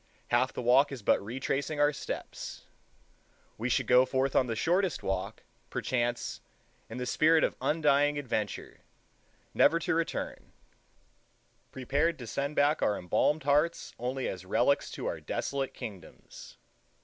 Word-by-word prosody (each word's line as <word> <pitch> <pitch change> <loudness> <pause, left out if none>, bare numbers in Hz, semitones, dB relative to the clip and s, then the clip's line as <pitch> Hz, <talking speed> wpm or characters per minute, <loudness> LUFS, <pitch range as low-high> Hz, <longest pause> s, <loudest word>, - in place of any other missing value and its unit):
Half 125 +2 +2
the - - -5
walk 130 +4 +5
is 130 -6 -7
but - - +3
retracing 135 +6 -2
our 145 0 +4
steps. - - -6 0.9
We 120 +3 -1
should - - +1
go 125 0 +6
forth 130 +1 0
on 130 - +4
the 115 - -2
shortest 180 - +1
walk, 95 -1 -3 0.3
perchance, 120 -1 -2 0.5
in 115 - -7
the 125 - -3
spirit 160 +4 +4
of - - +1
undying 145 -2 +2
adventure, 115 -7 -3 0.7
never 165 - +5
to 170 - -1
return,—prepared 160 -2 -5
to 125 - -8
send 140 +5 -3
back 145 +2 +3
our 105 - +2
embalmed 145 - +1
hearts 150 +4 +1
only 125 +2 -2
as 95 -1 -5
relics 120 +9 +1
to - - -6
our - - -2
desolate 135 -1 -3
kingdoms. 105 -9 -10
135 Hz, 135 wpm, -30 LUFS, 120-145 Hz, 0.9 s, go